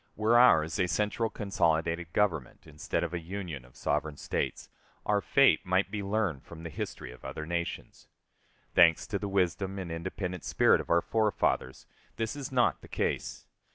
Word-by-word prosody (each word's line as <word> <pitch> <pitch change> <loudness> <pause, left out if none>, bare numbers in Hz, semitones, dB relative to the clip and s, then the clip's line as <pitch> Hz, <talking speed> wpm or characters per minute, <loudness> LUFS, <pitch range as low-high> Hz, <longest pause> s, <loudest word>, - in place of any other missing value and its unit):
Were 110 +2 +2
ours 80 -10 +5
a 90 - +2
central, 105 +5 0
consolidated 85 -4 0
Government, 85 -12 -1
instead 75 +1 -3
of 85 0 -3
a 85 - -1
Union 85 -5 -6
of 60 +1 -20
sovereign 75 -1 -1
States, - - -3 0.4
our 105 -1 +2
fate 140 +5 +4
might 95 +2 +1
be 105 -1 -3
learned 100 -8 -1
from 85 +1 -12
the 85 - -6
history - - -6
of 65 - -15
other 75 - -5
nations. 85 +1 -4 0.7
Thanks 85 -3 +5
to 100 -3 -3
the 100 - -4
wisdom 95 0 0
and 90 -3 -5
independent 90 +1 -4
spirit - - +3
of - - -12
our 85 0 +3
forefathers, 105 - 0 0.3
this 115 +4 -2
is 140 -2 -6
not 125 -2 +2
the - - -13
case. - - -3
90 Hz, 170 wpm, -30 LUFS, 80-105 Hz, 0.7 s, ours